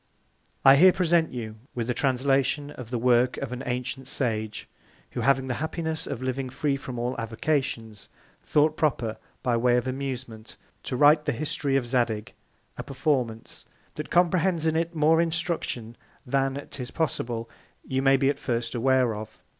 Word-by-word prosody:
I 135 +1 +9
here 185 +5 +8
present 175 -3 +2
you 110 -4 -6 0.2
with 120 -2 -2
a 125 - +1
Translation 135 +2 +1
of 125 -5 -9
the 125 - -1
Work 125 +1 +3
of - - -4
an 125 0 -5
ancient 125 +1 -3
Sage, 110 -6 -1 0.4
who - - -3
having 135 -1 +3
the 130 +1 -3
Happiness 160 0 -3
of 130 -2 -4
living 130 0 -2
free 140 +2 -1
from 130 -2 -7
all 120 +2 -2
Avocations, 115 -2 -2 0.3
thought 155 +1 +2
proper, 120 -8 0 0.3
by 120 -2 +2
Way 120 +1 +3
of 125 - 0
Amusement, 130 -4 -5 0.2
to 130 - -4
write 150 +2 +5
the - - +1
History 140 +1 -1
of 135 -3 +2
Zadig; 115 -4 -1 0.5
a - - -3
Performance, 130 -5 -2 0.3
that 150 - -6
comprehends 175 -1 +2
in 160 0 +2
it 165 +1 -1
more 160 +2 +4
Instruction 165 -9 -2 0.3
than, 135 +2 -1
'tis 125 -2 -5
possible, 120 -7 -2 0.4
you 130 0 -1
may 135 0 +5
at 140 0 0
first 120 -2 -2
be 120 - -2
aware 130 -1 +3
of. 110 +1 -8
130 Hz, 165 wpm, -26 LUFS, 120-150 Hz, 0.5 s, I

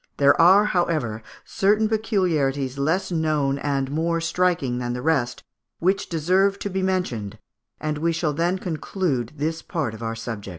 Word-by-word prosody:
There 140 +3 +5
are, 190 +5 +7
however, 155 - 0 0.2
certain 210 +3 +2
peculiarities 160 - 0
less 180 +7 0
known 155 -4 0
and 140 -2 -1
more 165 +2 0
striking 165 -7 0
than 120 -1 -2
the 125 - -4
rest, 140 -6 0 0.3
which 190 +3 0
deserve 185 +5 +2
to 200 - -2
be 190 +1 -1
mentioned, 125 - -2 0.4
and 155 -1 -2
we 170 +2 +1
shall 160 -2 -1
then 170 +5 0
conclude 160 - -2
this 160 +2 -2
part 155 - -3
of 110 - -10
our 115 0 -3
subject. 115 -3 -6
160 Hz, 160 wpm, -23 LUFS, 135-180 Hz, 0.4 s, are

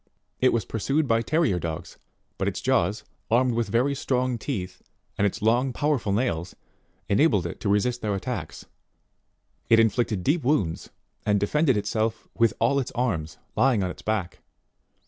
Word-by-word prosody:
It 130 - +4
was 115 -5 0
pursued 140 +9 0
by 115 -1 +3
terrier 150 - +1
dogs; 85 +1 -6 0.4
but - - 0
its - - -2
jaws, - - +1 0.3
armed 125 +2 +3
with 115 0 0
very 125 +5 +2
strong 130 -2 -1
teeth, 100 -7 -4 0.3
and 100 - +2
its 100 - -5
long 120 +4 +3
power 145 0 +1
ful 105 -3 -3
nails 95 -6 -1 0.5
enabled 105 - +3
it 85 - -5
to 105 - -2
resist 120 +5 +1
their 105 -2 -1
attacks; 95 -6 -5 1.0
it 115 -1 +6
inflicted 115 -3 +1
deep 150 - +1
wounds, 125 - 0 0.3
and 105 -1 +2
defended 130 +5 +2
itself 110 +2 -1
with 115 -2 +3
all 140 +5 +3
its 130 - -2
arms, 95 -11 -2 0.2
lying 125 -7 +3
on 90 - -1
its - - -11
back. 105 -5 -2
115 Hz, 165 wpm, -25 LUFS, 100-130 Hz, 1.0 s, it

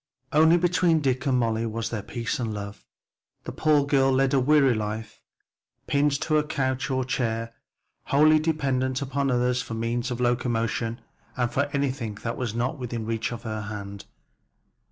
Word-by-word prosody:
Only 160 +3 +6
between 175 -1 +3
Dick 130 -1 0
and 130 -2 +3
Molly 115 -2 +1
there 115 - -1
was 115 +1 -4
peace 120 0 -3
and 115 -3 -2
love. 100 -1 -7 0.6
The - - -6
poor 150 -2 +2
girl 135 -1 +3
led 135 0 +2
a 135 - +4
weary 140 -1 +4
life 110 0 -4 0.6
pinned 140 0 +1
to 155 - -1
her - - +4
couch 135 -2 -2
or 130 -1 0
chair, 115 -3 -2 0.5
wholly 155 +2 +5
dependent 135 -4 0
upon 140 +1 -1
others 125 0 +1
for 115 - -6
the - - -4
means 120 +2 -1
of 125 -1 -4
locomotion 120 -2 -1 0.4
and 120 -2 0
for 140 - +1
anything 135 -6 -2
that 115 - -2
was 120 -4 -3
not 130 +5 -1
within 120 -3 -4
reach 115 +1 -2
of 120 -1 -6
her 110 -2 -4
hand. 100 -1 -7
125 Hz, 175 wpm, -26 LUFS, 115-140 Hz, 0.6 s, Only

